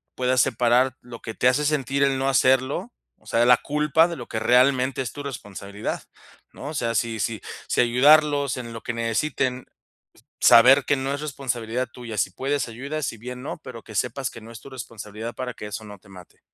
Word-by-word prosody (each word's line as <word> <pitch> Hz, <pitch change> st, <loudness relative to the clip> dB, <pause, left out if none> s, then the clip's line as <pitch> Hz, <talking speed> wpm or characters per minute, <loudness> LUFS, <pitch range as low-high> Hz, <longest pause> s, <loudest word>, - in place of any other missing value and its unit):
puedas 130 Hz, -1 st, +2 dB
separar 125 Hz, +1 st, +2 dB
lo 120 Hz, -1 st, -11 dB
que 110 Hz, -, -6 dB
te 125 Hz, -, +1 dB
hace 135 Hz, +4 st, +3 dB
sentir 140 Hz, -2 st, +1 dB
el 135 Hz, -1 st, +2 dB
no 135 Hz, -, 0 dB
hacerlo, 130 Hz, +1 st, +2 dB, 0.3 s
o -, -, -29 dB
sea, 120 Hz, +1 st, +2 dB
la 125 Hz, -, +8 dB
culpa 150 Hz, +3 st, +2 dB
de 170 Hz, -, -4 dB
lo 120 Hz, -, -8 dB
que 110 Hz, -, -3 dB
realmente 130 Hz, +3 st, +3 dB
es 125 Hz, -4 st, -4 dB
tu 145 Hz, -, -7 dB
responsabilidad, 105 Hz, -6 st, -6 dB, 0.5 s
¿no? 140 Hz, -, -9 dB
O -, -, -6 dB
sea, 115 Hz, -4 st, -1 dB
si 115 Hz, 0 st, -1 dB
si 110 Hz, -2 st, -2 dB, 0.3 s
si -, -, 0 dB
ayudarlos 145 Hz, +2 st, +4 dB
en 120 Hz, -2 st, -7 dB
lo 115 Hz, -, -7 dB
que 120 Hz, -, -4 dB
necesiten, 125 Hz, +2 st, -1 dB, 0.8 s
s -, -, +5 dB
saber 130 Hz, +4 st, +8 dB
que 145 Hz, -, +2 dB
no 135 Hz, +1 st, -2 dB
es 145 Hz, -, -7 dB
responsabilidad 125 Hz, -4 st, -3 dB
tuya, 115 Hz, -4 st, -8 dB
si 95 Hz, -, +1 dB
puedes 135 Hz, +5 st, -2 dB
ayudas, 140 Hz, +5 st, -4 dB
si 115 Hz, -, -5 dB
bien 125 Hz, +3 st, -8 dB
no, 145 Hz, -, -5 dB
pero 120 Hz, -3 st, -9 dB
que 110 Hz, -, -12 dB
sepas 125 Hz, +5 st, -1 dB
que 115 Hz, -, -11 dB
no 115 Hz, -, -12 dB
es 115 Hz, -, -10 dB
tu 140 Hz, -, -12 dB
responsabilidad 115 Hz, -2 st, -7 dB
para 125 Hz, -1 st, -5 dB
que -, -, -8 dB
eso 110 Hz, +1 st, -6 dB
no 105 Hz, -1 st, -10 dB
te 100 Hz, -, -21 dB
mate. 90 Hz, -2 st, -15 dB
125 Hz, 215 wpm, -24 LUFS, 115-135 Hz, 0.8 s, la